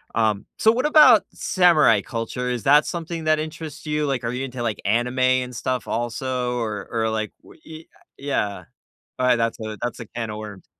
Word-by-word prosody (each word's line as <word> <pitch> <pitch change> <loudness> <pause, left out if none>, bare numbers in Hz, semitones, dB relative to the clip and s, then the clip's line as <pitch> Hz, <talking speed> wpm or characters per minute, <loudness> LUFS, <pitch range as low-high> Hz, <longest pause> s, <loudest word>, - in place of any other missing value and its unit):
um 110 -3 +1
so 220 - +5
what 255 +5 -1
about 300 -7 +7
samurai 160 - +4
culture, 115 +2 -4
is 125 -2 -2
that 145 +2 +5
something 165 -1 -5
that 155 0 +2
interests 155 -1 -7
you, 150 0 0
like, 135 -4 -2
are 115 - -2
you 130 +2 -3
into, 125 -1 -7
like, 115 -3 -2
anime 120 +5 0
and 130 -1 +2
stuff, 130 +2 -3
also, 125 +1 -2
or 110 -3 -4
or, 110 -1 0
like, 110 -1 -2
wh - - -16
i 160 0 -10 0.3
yeah, 135 -8 -2 0.6
alright, 125 -1 +4
that's 115 0 -1
a 110 -1 -6
that's 120 - -3
a 115 - -8
can 115 -2 -5
of 105 - -6
worms. 105 -3 -9
125 Hz, 195 wpm, -23 LUFS, 115-150 Hz, 0.6 s, about